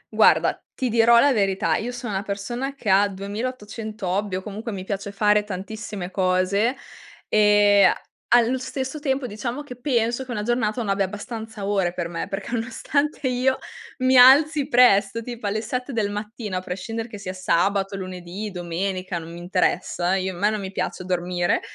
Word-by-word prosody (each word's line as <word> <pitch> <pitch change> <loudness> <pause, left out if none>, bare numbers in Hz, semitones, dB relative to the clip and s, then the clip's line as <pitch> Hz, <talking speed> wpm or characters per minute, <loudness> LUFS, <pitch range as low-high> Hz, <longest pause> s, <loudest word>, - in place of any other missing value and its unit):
Guarda, - - +4
ti 255 -2 -1
dirò 235 +1 +5
la 285 +1 +5
verità: 195 -4 +1
io 245 +3 -3
sono 240 -4 -5
una 190 - -1
persona 240 +7 -4
che 235 - -10
ha 200 +2 +5
2.800 210 +1 -5
hobby, 195 +1 -1
o 185 - -4
comunque 215 +3 -6
mi 190 -2 -5
piace 200 +1 -4
fare 210 +1 +3
tantissime 200 -1 -6
cose, 190 +5 +1 0.5
e 205 -1 +5
a - - +3 0.4
allo 240 +2 +4
stesso 265 +2 -4
tempo, 275 -3 -1
diciamo, 235 +6 -4
che 250 -4 -9
penso 240 -1 0
che - - -23
una 210 -3 -2
giornata 240 -1 0
non 210 - -3
abbia 195 -1 +1
abbastanza 220 +1 -7
ore 195 -4 +1
per 175 -2 -3
me, 170 -1 -4
perché, 195 +3 -5
nonostante 260 +5 -1
io 255 +1 +1 0.4
mi 255 +1 +3
alzi 280 +3 +7
presto, 230 -4 +4
tipo 240 -2 -7
alle 215 +2 -1
7 250 +3 -4
del 210 -3 0
mattino, 210 -1 -5
a 185 - -2
prescindere 225 +5 -5
che 220 - -9
sia 185 -1 -5
sabato, 195 +2 +1
lunedì, 185 +2 -6
domenica, 185 +1 -3
non 165 +1 -9
mi - - -8
interessa, 180 0 0
io 190 0 -1
me 200 +4 +2
non 215 - -2
mi 190 - -5
piace 185 -1 -3
dormire, 175 -1 0
210 Hz, 175 wpm, -23 LUFS, 190-240 Hz, 0.5 s, alzi